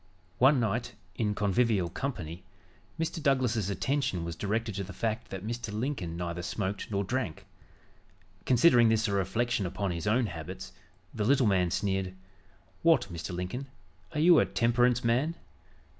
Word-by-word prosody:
One 135 Hz, +2 st, +6 dB
night, 115 Hz, +1 st, -1 dB, 0.2 s
in 105 Hz, +2 st, -1 dB
a -, -, 0 dB
convivial 105 Hz, -2 st, +2 dB
company, 90 Hz, -, -5 dB, 0.6 s
Mr. 165 Hz, 0 st, -2 dB
Douglas's 125 Hz, -7 st, +1 dB
attention 125 Hz, -5 st, -1 dB
was 85 Hz, -1 st, -4 dB
directed 110 Hz, +4 st, -2 dB
to 100 Hz, +1 st, -3 dB
the 100 Hz, +2 st, -8 dB
fact 110 Hz, 0 st, -2 dB
that 95 Hz, +1 st, -6 dB
Mr. 115 Hz, -1 st, -4 dB
Lincoln 105 Hz, -, -3 dB
neither 85 Hz, 0 st, -3 dB
smoked 95 Hz, +3 st, -3 dB
nor 100 Hz, -1 st, 0 dB
drank. 120 Hz, -5 st, -3 dB, 1.0 s
Considering 125 Hz, -2 st, +5 dB
this 110 Hz, 0 st, +2 dB
a -, -, -1 dB
reflection 100 Hz, +2 st, 0 dB
upon 95 Hz, +1 st, -2 dB
his 85 Hz, +3 st, -4 dB
own 120 Hz, +4 st, +3 dB
habits, 90 Hz, 0 st, -7 dB, 0.4 s
the 110 Hz, -, -2 dB
little 130 Hz, +3 st, +4 dB
man 95 Hz, -4 st, +3 dB
sneered: 95 Hz, 0 st, -1 dB, 0.7 s
"What, 160 Hz, -, +3 dB
Mr. 85 Hz, +2 st, -5 dB
Lincoln, 90 Hz, +10 st, -4 dB, 0.4 s
are 155 Hz, -, -3 dB
you 165 Hz, +1 st, +7 dB
a -, -, +4 dB
temperance 120 Hz, +1 st, +2 dB
man?" 130 Hz, +8 st, +1 dB
110 Hz, 155 wpm, -29 LUFS, 95-125 Hz, 1.0 s, you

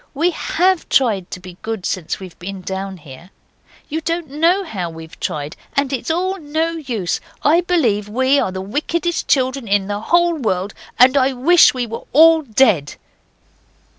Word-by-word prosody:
We 335 Hz, +5 st, +2 dB
HAVE 365 Hz, +1 st, 0 dB
tried 215 Hz, -9 st, +2 dB
to -, -, -7 dB
be 180 Hz, -1 st, -12 dB
good 220 Hz, -4 st, -5 dB
since 175 Hz, -4 st, -3 dB
we've 185 Hz, -3 st, -11 dB
been 190 Hz, +1 st, -7 dB
down 190 Hz, +1 st, -5 dB
here. 150 Hz, +2 st, -13 dB, 0.6 s
You 315 Hz, +2 st, -3 dB
don't 330 Hz, -2 st, -3 dB
know 335 Hz, +7 st, +2 dB
how 190 Hz, -, -4 dB
we've 160 Hz, 0 st, -11 dB
tried! 150 Hz, 0 st, -4 dB, 0.2 s
And 280 Hz, -1 st, 0 dB
it's 265 Hz, -, -3 dB
all 370 Hz, +4 st, -1 dB
no 315 Hz, +2 st, -1 dB
use. 245 Hz, -, -3 dB, 0.2 s
I 325 Hz, +4 st, +4 dB
believe 240 Hz, -, 0 dB
we 260 Hz, +5 st, +2 dB
are 190 Hz, -, -1 dB
the 190 Hz, 0 st, -5 dB
wickedest 320 Hz, -, -2 dB
children 260 Hz, -2 st, +1 dB
in 200 Hz, -1 st, +1 dB
the 205 Hz, +1 st, -3 dB
whole 345 Hz, +7 st, +3 dB
world, 200 Hz, -, -2 dB, 0.2 s
and 255 Hz, +2 st, +6 dB
I 270 Hz, -1 st, +3 dB
wish 300 Hz, +5 st, +5 dB
we 250 Hz, -1 st, -1 dB
were 230 Hz, 0 st, -7 dB
all 320 Hz, +3 st, +7 dB
dead! 220 Hz, -, +2 dB
255 Hz, 170 wpm, -18 LUFS, 190-320 Hz, 0.6 s, all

